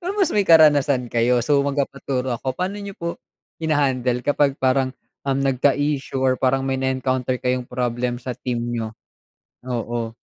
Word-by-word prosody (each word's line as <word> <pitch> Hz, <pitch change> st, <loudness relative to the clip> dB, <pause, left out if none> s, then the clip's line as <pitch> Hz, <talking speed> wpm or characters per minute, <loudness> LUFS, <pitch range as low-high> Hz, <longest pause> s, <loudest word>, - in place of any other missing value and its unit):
Pero 360 Hz, +1 st, -3 dB
may 395 Hz, -, +4 dB
mas -, -, -2 dB
karanasan 150 Hz, -, +4 dB
kayo 120 Hz, 0 st, +2 dB
so 145 Hz, 0 st, +3 dB
magpapaturo 140 Hz, -2 st, -2 dB
ako, 130 Hz, -1 st, -3 dB
paano 195 Hz, +3 st, -3 dB
niyo 200 Hz, -1 st, -7 dB
po 170 Hz, 0 st, -5 dB, 0.4 s
hinahandle 130 Hz, -6 st, +1 dB
kapag 145 Hz, -1 st, +2 dB
parang, 130 Hz, 0 st, +1 dB, 0.3 s
um, 135 Hz, -, +2 dB
nagka-issue 135 Hz, +1 st, +1 dB
or 130 Hz, -1 st, +1 dB
parang 135 Hz, +1 st, +2 dB
may 135 Hz, 0 st, -1 dB
na-encounter 130 Hz, -1 st, 0 dB
kayong 125 Hz, 0 st, -2 dB
problem 125 Hz, 0 st, -2 dB
sa 125 Hz, +1 st, -5 dB
team 120 Hz, -1 st, -3 dB
niyo? 110 Hz, -1 st, -4 dB, 0.7 s
Oo. 115 Hz, -1 st, -3 dB
130 Hz, 150 wpm, -22 LUFS, 125-140 Hz, 0.7 s, may